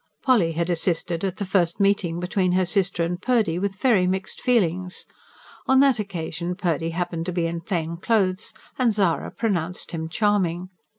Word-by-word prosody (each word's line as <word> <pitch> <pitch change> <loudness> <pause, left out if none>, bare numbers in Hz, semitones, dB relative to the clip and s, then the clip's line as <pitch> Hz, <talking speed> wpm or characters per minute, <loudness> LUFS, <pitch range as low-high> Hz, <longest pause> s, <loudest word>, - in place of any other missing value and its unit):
Polly 210 - +3
had 170 +2 -1
assisted 170 0 -1
at 190 -2 -2
the 200 - -2
first 180 -3 +1
meeting 195 -4 +1
between 180 0 0
her 185 0 +3
sister 185 -2 +1
and 175 +2 -3
Purdy 220 -9 +1
with 195 0 -2
very 195 -4 +3
mixed 190 +1 -3
feelings. 185 -7 0 0.6
On 265 0 +5
that 270 -4 +4
occasion 175 -3 -4
Purdy 165 -3 -1
happened 170 0 -3
to - - -1
be 175 -1 0
in 165 0 -3
plain 170 -1 -3
clothes, 190 -1 0 0.3
and 245 -3 +4
Zara 190 -5 +1
pronounced 180 -6 -2
him 160 -2 -4
charming. 185 -2 0
180 Hz, 170 wpm, -24 LUFS, 170-200 Hz, 0.6 s, On